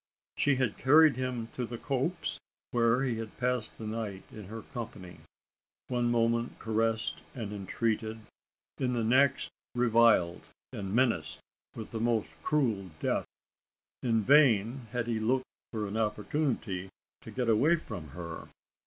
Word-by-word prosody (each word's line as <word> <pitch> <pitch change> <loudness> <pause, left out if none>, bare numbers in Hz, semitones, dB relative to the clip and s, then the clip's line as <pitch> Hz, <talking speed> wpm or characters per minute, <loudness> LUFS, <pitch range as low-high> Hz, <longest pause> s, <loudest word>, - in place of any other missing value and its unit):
She 145 -1 +3
had 130 -5 -1
carried 150 +1 +6
him 125 -2 -2
to 125 - -4
the 120 0 -5
copse, 140 +8 -2 0.3
where 120 +2 +3
he 125 -4 0
had 115 -1 -7
passed 125 -3 -1
the 110 - -7
night 110 -3 -4
in 105 -2 -9
her 110 +3 -7
company 110 -8 -8 0.7
one 120 -1 +1
moment 115 0 +1
caressed 110 0 0
and 110 -5 -4
entreated 110 +2 -2 0.6
in 125 -1 +1
the 120 -2 0
next 130 +4 +3 0.2
reviled, 115 -7 +4 0.3
and 100 -5 -4
menaced 90 -11 +1 0.4
with 110 - -7
the 115 - -3
most 115 -2 0
cruel 115 -11 +1
death! - - 0 0.7
In 115 -3 +2
vain 125 -3 +4
had 120 0 -1
he 115 -2 -1
looked 125 +4 +1 0.3
for 110 -2 -2
an 100 +2 -4
opportunity 105 -3 -1 0.3
to - - -10
get 125 -2 -2
away 130 +10 +5
from 105 - -7
her. 85 +3 -7
115 Hz, 145 wpm, -30 LUFS, 110-125 Hz, 0.7 s, carried